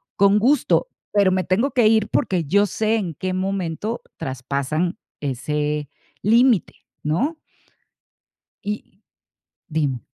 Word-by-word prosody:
con 200 Hz, +1 st, +5 dB
gusto, 270 Hz, -, +3 dB, 0.2 s
pero 200 Hz, -2 st, +4 dB
me 185 Hz, 0 st, +1 dB
tengo 225 Hz, -, +1 dB
que 240 Hz, -3 st, +4 dB
ir 220 Hz, -1 st, +3 dB
porque, 180 Hz, -3 st, +1 dB
yo 200 Hz, +8 st, +4 dB
sé 220 Hz, +3 st, +1 dB
en 175 Hz, -7 st, -3 dB
qué 185 Hz, +5 st, -3 dB
momento 190 Hz, +3 st, -2 dB, 0.2 s
traspasan 140 Hz, +7 st, -2 dB, 0.2 s
ese 150 Hz, +2 st, -2 dB, 0.3 s
límite, 230 Hz, -1 st, +4 dB, 0.3 s
¿no? 260 Hz, -, 0 dB, 1.2 s
Y 205 Hz, -1 st, -6 dB, 0.7 s
dime. 145 Hz, -6 st, -1 dB
185 Hz, 110 wpm, -22 LUFS, 150-215 Hz, 1.2 s, con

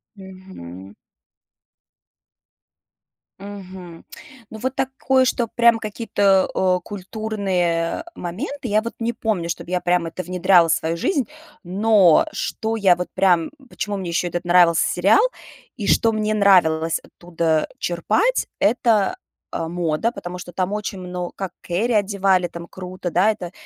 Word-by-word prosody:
Мгм. 185 Hz, -, -11 dB, 2.5 s
Мгм. 185 Hz, -4 st, -10 dB, 0.5 s
Ну, 220 Hz, -, -9 dB
вот 260 Hz, +3 st, -3 dB
такое, 265 Hz, 0 st, +1 dB
что 240 Hz, -2 st, 0 dB
прям 235 Hz, 0 st, +3 dB
какие-то, 205 Hz, -3 st, +1 dB
э, 185 Hz, -1 st, +2 dB
культурные, 190 Hz, -4 st, -2 dB
э, -, -, -6 dB
моменты. 250 Hz, -, -5 dB
Я 215 Hz, 0 st, +2 dB
вот 230 Hz, -, -6 dB
не 230 Hz, +1 st, -1 dB
помню, 215 Hz, -7 st, -2 dB
чтобы 170 Hz, +1 st, -5 dB
я 180 Hz, -, +1 dB
прям 175 Hz, -1 st, +1 dB
это 185 Hz, +3 st, -6 dB
внедряла 180 Hz, 0 st, +4 dB
в 160 Hz, -, +3 dB
свою 165 Hz, +1 st, -1 dB
жизнь, 275 Hz, -, 0 dB, 0.4 s
но 195 Hz, -1 st, +4 dB
что 225 Hz, +1 st, -3 dB
я 195 Hz, -5 st, +4 dB
вот 180 Hz, -, -3 dB
прям, 175 Hz, -4 st, +2 dB, 0.2 s
почему 205 Hz, -3 st, -4 dB
мне 190 Hz, -3 st, -4 dB
ещё 175 Hz, +1 st, 0 dB
этот 175 Hz, +1 st, -4 dB
нравился 175 Hz, -1 st, +4 dB
сериал, 195 Hz, -, +3 dB, 0.6 s
и 205 Hz, -4 st, -4 dB
что 225 Hz, -, +3 dB
мне 215 Hz, -1 st, -1 dB
нравилось 170 Hz, -6 st, +3 dB
оттуда 165 Hz, -2 st, -2 dB
черпать, 345 Hz, -, 0 dB
это, 220 Hz, -2 st, +2 dB, 0.4 s
э, 165 Hz, -, -2 dB
мода, 170 Hz, +5 st, -1 dB
потому 180 Hz, -6 st, -7 dB
что 175 Hz, -, -9 dB
там 185 Hz, +2 st, -2 dB
очень 210 Hz, -2 st, -4 dB
мно 180 Hz, -1 st, -5 dB
как 190 Hz, -3 st, -6 dB
Кэрри 215 Hz, +8 st, -1 dB
одевали, 195 Hz, -3 st, +2 dB
там 170 Hz, 0 st, -9 dB
круто, 185 Hz, 0 st, -6 dB
да. 190 Hz, +6 st, +3 dB
Это 175 Hz, -5 st, -7 dB
185 Hz, 140 wpm, -21 LUFS, 175-215 Hz, 2.5 s, внедряла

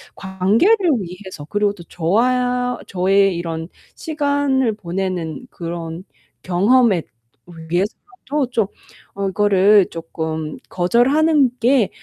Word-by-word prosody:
관계를 195 Hz, -, +2 dB, 0.2 s
위해서 185 Hz, -4 st, -8 dB
그리고 205 Hz, +5 st, 0 dB
또 185 Hz, -4 st, -12 dB
저와 245 Hz, +9 st, 0 dB
저의 195 Hz, +1 st, +2 dB
이런 165 Hz, -1 st, -4 dB, 0.3 s
시간을 285 Hz, -5 st, 0 dB
보내는 185 Hz, 0 st, -4 dB
그런 170 Hz, -1 st, -6 dB, 0.4 s
경험에 200 Hz, +1 st, +3 dB, 0.7 s
위해서라도 270 Hz, -, -2 dB
좀 225 Hz, -5 st, +1 dB, 0.5 s
어 200 Hz, 0 st, -2 dB
이거를 200 Hz, 0 st, +4 dB
쪼끔 160 Hz, -1 st, -5 dB
'거절하는 270 Hz, -, +3 dB
게 240 Hz, -4 st, +3 dB
200 Hz, 220 characters per minute, -19 LUFS, 175-250 Hz, 0.7 s, 이거를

